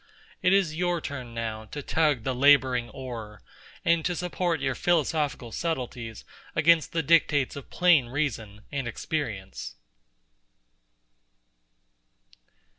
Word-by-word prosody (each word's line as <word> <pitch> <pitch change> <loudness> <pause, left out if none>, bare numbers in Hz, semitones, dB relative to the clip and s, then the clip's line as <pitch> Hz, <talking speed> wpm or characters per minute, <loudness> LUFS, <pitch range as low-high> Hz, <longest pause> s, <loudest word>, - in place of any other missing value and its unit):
It 185 - +3
is 195 -5 +3
your 175 0 0
turn 130 -6 -6
now 110 -1 -4
to 145 +6 -7
tug 150 -7 +1
the 130 - -1
labouring 130 -2 +4
oar, 115 -5 -8 0.4
and 170 -1 +3
to 180 - 0
support 175 -1 -1
your 135 -1 0
philosophical 150 -7 0
subtleties 125 -7 -4 0.3
against 160 0 +4
the 165 -1 0
dictates 145 -3 +3
of 140 - -9
plain 175 -8 +4
reason 110 -7 -3
and 140 -4 -2
experience. 110 - -4
140 Hz, 115 wpm, -27 LUFS, 120-165 Hz, 0.4 s, labouring